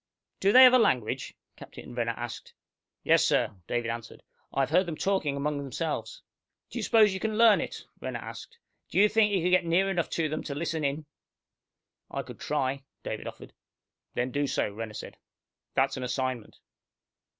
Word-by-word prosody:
"Do 195 - +3
they 255 +4 +9
have 255 -1 +9
a 255 - +7
language?" 125 - 0 0.2
Captain - - -11
Renner 115 -1 -1
asked. 120 -1 -7 0.5
"Yes, - - +4
sir," - - +2 0.2
David 120 -1 -1
answered. 115 -1 -8 0.3
"I 135 - 0
have 135 - -1
heard 180 +2 +3
them 165 - -3
talking 175 -8 0
among 145 +1 -1
themselves." 160 - -4 0.5
"Do - - -4
you - - -3
suppose 215 -4 +5
you 190 - -3
can 215 0 -2
learn 225 -2 +6
it?" - - -6 0.2
Renner - - -3
asked. 470 - -9 0.3
"Do - - -4
you 210 - +7
think 210 -1 +3
you 190 -4 +1
could 180 - +2
get 185 0 +5
near 180 +4 +2
enough 175 -3 -1
to 165 -2 +1
them 155 +1 -3
to 140 - -4
listen 160 0 -2
in?" 145 +2 -1 1.0
"I - - -4
could - - -11
try," 135 -2 -1 0.2
David - - -5
offered. - - -10 0.6
"Then 125 +1 -1
do 145 +2 0
so," 105 - -1
Renner 110 0 -6
said. - - -8 0.6
"That's 135 +1 +2
an 130 - -4
assignment." 130 -2 -3
150 Hz, 185 wpm, -28 LUFS, 130-195 Hz, 1.0 s, they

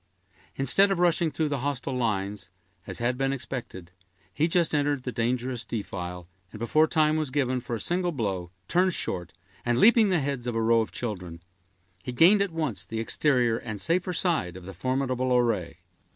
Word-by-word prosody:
Instead 165 +10 +4
of 195 - 0
rushing 170 -1 +3
through 155 0 -1
the 140 -2 -1
hostile 135 -1 -2
lines, 100 -5 -2 0.4
as - - -4
had 125 +2 -1
been 135 0 +1
expected, 120 -9 -6 0.4
he 155 +2 +2
just 170 -1 +1
entered 145 -2 +1
the 125 - -3
dangerous 120 +1 -1
defile, 90 -6 -5 0.2
and - - -9
before 155 +8 +3
time 155 0 +2
was 155 -3 -1
given 130 -2 0
for 120 -1 -4
a - - -5
single 175 - 0
blow, 100 - -3 0.2
turned 180 - +2
short, 90 -2 -1 0.3
and 120 -1 +1
leaping 220 - +6
the 180 -3 +2
heads 135 -3 -3
of 120 - -2
a 115 - +1
row 115 0 +4
of 110 - -4
children, 90 -8 -5 0.6
he 125 - -5
gained 175 +11 +5
at 200 - +1
once 155 - -3
the 115 - -5
exterior 120 -1 +1
and 110 -3 -6
safer 175 - 0
side 165 - 0
of 90 - -11
the 95 - -8
formidable 130 +4 0
array. 90 -9 -1
125 Hz, 185 wpm, -27 LUFS, 110-155 Hz, 0.6 s, leaping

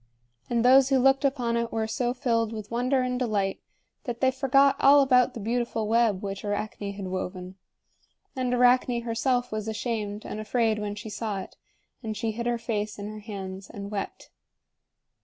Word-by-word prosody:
And 235 0 +1
those 265 +1 +7
who 270 - +4
looked 270 +2 +4
upon 250 -4 0
it 235 0 -2
were 225 -1 -1
so 240 +2 -1
filled 230 -3 0
with 215 -1 -7
wonder 255 +2 +1
and 250 0 -1
delight, 205 -6 0 0.5
that 240 -3 -4
they 260 -1 +3
forgot 275 +1 +4
all 280 +1 +7
about 255 -2 +4
the - - -5
beautiful 230 0 -1
web 225 -3 +2
which 195 -1 -5
Arachne 205 -1 -3
had 200 -1 -6
woven. 185 0 -5 0.8
And 255 -1 -1
Arachne 245 -1 +3
herself 245 +2 0
was 215 0 -3
ashamed 215 -2 -3
and 215 - -5
afraid 220 0 +1
when 205 -1 -3
she 210 +1 -8
saw 210 -3 -3
it; - - -11 0.5
and 220 -3 -4
she 225 +1 -1
hid 235 +2 -4
her 240 0 +1
face 215 -2 -3
in 205 0 -6
her 215 0 -8
hands 195 -3 -7
and 200 0 -7
wept. 200 -2 -5
230 Hz, 180 wpm, -27 LUFS, 210-250 Hz, 0.8 s, those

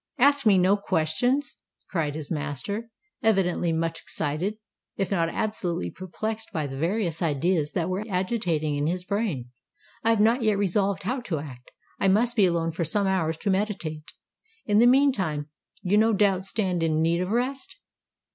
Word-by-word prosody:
"Ask 280 -1 +4
me 200 -3 +6
no 185 +3 +4
questions!" 205 - 0 0.3
cried 155 -6 -1
his 155 -2 -6
master, 160 - -3 0.3
evidently 185 -5 +2
much 165 0 -1
excited—if 190 +4 -4
not 165 -4 +1
absolutely 175 - -2
perplexed 215 +4 -5
by 155 -5 -2
the 135 -1 -6
various 170 +2 -1
ideas 155 0 +1
that 170 -2 0
were 185 +3 -2
agitating 180 -6 0
in 145 +1 0
his 180 +2 -2
brain. 185 - -2 0.5
"I 225 - +3
have 225 -2 +3
not 230 +4 +4
yet 215 -3 +2
resolved 200 0 +1
how 250 +7 -1
to 190 -9 -3
act: 130 -4 -9 0.3
I 195 - +2
must 230 +5 +3
be 205 -5 +5
alone 165 -1 0
for 165 +1 -2
some 205 +4 +1
hours 165 -5 0
to 200 - +1
meditate! 190 -6 -2 0.5
In 210 0 +3
the 240 - +7
meantime 195 - +2 0.3
you 200 +3 +3
no 225 +1 +4
doubt 195 -2 +2
stand 190 -4 -1
in 160 -1 +1
need 170 +2 +2
of 180 - -2
rest? 255 +5 -2
185 Hz, 165 wpm, -26 LUFS, 160-215 Hz, 0.5 s, the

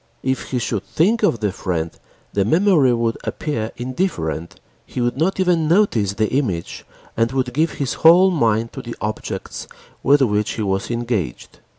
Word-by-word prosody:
If 130 0 -2
he 130 - -1
should 110 -4 -1
think 195 - +1
of 125 - +2
the 105 -2 +1
friend 85 -3 -3 0.4
the 100 - +2
memory 160 - +4
would 115 -1 0
appear 115 -8 -3
indifferent, 120 - -3 0.2
he - - -7
would 120 0 0
not 170 +8 0
even 175 -4 +2
notice 155 - +2
the 110 +1 0
image 100 -12 -2 0.3
and 115 +1 +1
would 130 -2 -1
give 155 +3 +1
his 140 -3 -2
whole 180 +4 +7
mind 115 -7 +1
to - - -6
the 120 - -7
objects 105 0 -5 0.3
with 140 0 +4
which 105 -3 0
he 110 - -3
was 95 -1 -1
engaged. 115 - -3
120 Hz, 170 wpm, -20 LUFS, 105-155 Hz, 0.4 s, whole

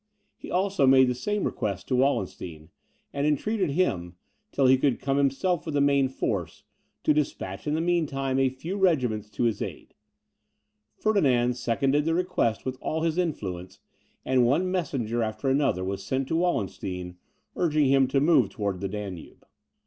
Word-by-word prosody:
He - - -11
also 185 -6 +1
made 130 0 +6
the - - +1
same 205 +11 -2
request 100 -4 -3
to 130 - +2
Wallenstein, 95 - -1 0.4
and 140 +1 0
entreated 185 +5 0
him, 90 - -1 0.4
till 135 - +1
he 130 +1 +7
could 130 0 +1
himself 140 +6 +1
come - - -25
with 155 - -3
the - - +3
main 140 -1 +3
force, 95 -10 -3 0.4
to 150 - +4
despatch 135 -8 -3
in 150 - +1
the 160 - 0
mean 170 -2 +1
time 135 -1 -1
a 135 -1 +3
few 160 +10 -6
regiments 125 - +1
to 115 - -3
his 115 -4 0
aid. - - -6 1.0
Ferdinand 130 - +2
seconded 135 +4 +1
the 165 0 +1
request 180 -11 0
with 130 0 -4
all 160 +1 -2
his 165 +1 0
influence, 95 - -4 0.5
and 130 -1 +3
one 160 +10 +2
messenger 130 - -1
after 110 +3 -2
another 135 -9 +1
was 95 +1 -4
sent 130 +6 -2
to - - 0
Wallenstein, 95 - -2 0.4
urging 155 -4 +2
him 135 0 +4
to 135 +1 +1
move 140 - +4
towards 100 -2 -3
the 100 0 -3
Danube. 100 -4 -7
135 Hz, 170 wpm, -26 LUFS, 110-155 Hz, 1.0 s, he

